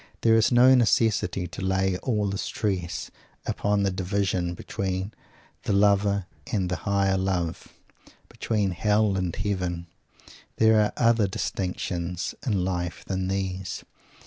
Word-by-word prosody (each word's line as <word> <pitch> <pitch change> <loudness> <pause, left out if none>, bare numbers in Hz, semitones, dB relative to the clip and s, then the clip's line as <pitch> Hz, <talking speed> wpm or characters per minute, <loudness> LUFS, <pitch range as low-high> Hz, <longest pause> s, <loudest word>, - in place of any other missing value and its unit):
There 115 - +4
is 115 +2 +4
no 125 +2 +7
necessity 110 -6 +2
to 85 -2 -7
lay 95 0 +1
all 105 -5 0
the 100 0 -3
stress 90 -8 -3 0.3
upon 105 0 0
the 100 - +1
division 95 -2 -1
between 95 +3 -3 0.5
the - - -1
Lower 100 -1 +3 0.3
and 95 -4 0
the 90 - 0
Higher 100 +1 +1
Love, 90 -3 -2 0.6
between 105 -4 -1
Hell 105 +2 +2
and 90 -3 -1
Heaven. 90 -4 -2 0.7
There 110 -1 +5
are 105 - +1
other 115 -3 +3
distinctions 90 -2 -3
in 100 -8 0
life 90 -2 -3
than 95 -1 -2
these. 95 -1 -3
95 Hz, 130 wpm, -26 LUFS, 90-105 Hz, 0.7 s, no